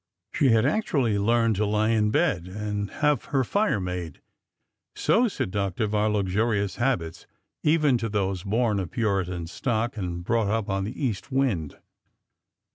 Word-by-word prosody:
She 140 - +3
had 115 0 +4
actually 135 - +1
learned 115 0 +2
to 105 - +1
lie 105 +1 +1
in 110 -2 +2
bed 90 -4 +1
and 105 +1 -3
have 150 -1 0
her 135 -2 +1
fire 200 - +1
made,— 90 -4 -5 0.8
so 245 +2 +3
seductive 100 - -2
are 105 0 +2
luxurious 100 0 0
habits, 105 -11 -1 0.3
even 150 -5 +3
to 115 - -2
those 95 -3 -1
born 105 +1 +1
of 90 -4 -3
Puritan 95 -6 -1
stock 115 +6 -2
and 85 -3 -4
brought 115 +2 +1
up 110 -1 -1
on 95 0 -1
the 125 +7 -4
east 110 +1 -3
wind. 120 - 0
105 Hz, 150 wpm, -26 LUFS, 95-120 Hz, 0.8 s, had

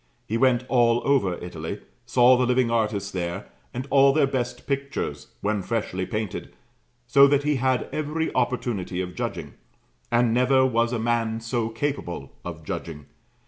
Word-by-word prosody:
He 110 - -3
went 125 0 +3
all 120 -2 +3
over 120 -11 +2
Italy, 85 +2 -6 0.3
saw 125 +1 +6
the 125 0 +1
living 125 -1 +2
artists 105 -4 0
there, 90 +2 -3 0.3
and 125 +2 -5
all 140 0 +6
their 150 -1 +4
best 125 -2 -3
pictures 140 0 -3
when 105 0 0
freshly 95 -4 -2
painted, 105 -3 -4 0.5
so 140 0 +6
that 140 0 +2
he 150 -1 +1
had 130 0 +1
every 155 +1 -2
opportunity 120 -7 -1
of 90 -1 -3
judging; - - -4 0.6
and 120 -1 +3
never 130 +2 +4
was 115 -2 +1
a 120 - -1
man 115 -1 0
so 115 0 -2
capable 115 - -4
of - - -7
judging. 75 -3 -6
120 Hz, 155 wpm, -25 LUFS, 105-130 Hz, 0.6 s, saw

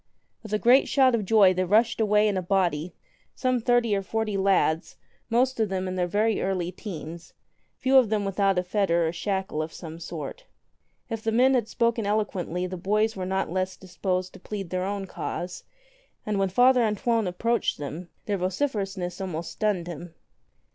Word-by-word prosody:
With 220 - -10
a 215 - +2
great 245 +5 +5
shout 260 -3 +4
of 220 -4 0
joy 200 -2 +5
they 185 0 0
rushed 220 +4 +2
away 210 0 +4
in 205 - 0
a 185 - 0
body, 175 -3 0 0.4
some 255 -1 +1
thirty 240 -2 +2
or 195 - 0
forty 215 +1 -2
lads 190 -4 +1 0.3
most 250 +2 +2
of 220 -2 +1
them 190 -1 -2
in 185 - -3
their 180 -1 0
very 215 +4 +1
early 180 -2 -1
teens, 170 -4 -8 0.4
few 265 +1 +4
of 240 -5 +1
them 210 -2 0
without 195 -1 +1
a 180 - +2
fetter 180 -3 +1
or - - -1
shackle 190 -3 -2
of 155 +1 -4
some 165 -1 -9
sort. - - -7 0.7
If 225 -1 -3
the 225 - -1
men 255 +4 +4
had 240 -4 +1
spoken 230 -2 0
eloquently 190 -4 -1
the 185 0 -5
boys 215 +5 +1
were 185 -1 -4
not 190 -3 -1
less 185 +1 -2
disposed 185 0 -3
to - - -12
plead 195 -2 -6
their 185 0 -1
own 200 0 -3
cause, 180 -1 -5 0.6
and 210 -2 -1
when 195 -1 +1
Father 250 +6 +5
An 215 -2 +1
toine 225 0 0
approached 230 +5 0
them 155 +5 -6 0.2
their 205 -2 -1
vociferousness 195 -3 -2
almost 170 -3 -4
stunned 205 -5 -1
him. 170 0 -8
195 Hz, 190 wpm, -26 LUFS, 180-220 Hz, 0.7 s, great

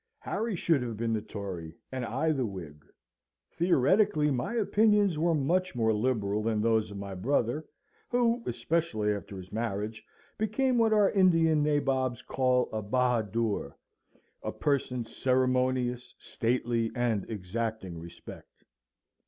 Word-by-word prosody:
Harry 225 -2 -2
should 165 -5 +2
have 115 -3 -4
been 115 0 -1
the 110 - 0
Tory, 95 -7 -7 0.2
and 130 -1 -3
I 135 +7 0
the 135 -4 0
Whig. 85 -9 -7 0.7
Theoretically 170 - +3
my 130 - -2
opinions 210 -5 +3
were 170 +2 +2
very 140 -3 0
much 185 +1 +1
more 110 -2 +2
liberal 105 -2 0
than 110 0 0
those 110 0 +2
of 100 - -8
my 100 -1 -6
brother, 120 +8 0 0.4
who, 240 -1 +2
especially 115 -11 0
after 100 -1 -7
his 95 0 -10
marriage, 110 -1 -3 0.4
became 240 +4 +1
what 225 -1 +4
our 210 -2 +4
Indian 165 -5 +4
nabobs 135 -4 0
call 125 -1 +1
a 110 - -1
Bahadoor 115 -1 0 0.7
a - - -3
person 130 -4 -1
ceremonious, 130 0 0
stately, 115 -1 -1
and 120 -5 0
exacting 105 -3 -4
respect. 85 +1 -12
125 Hz, 135 wpm, -29 LUFS, 110-155 Hz, 0.7 s, what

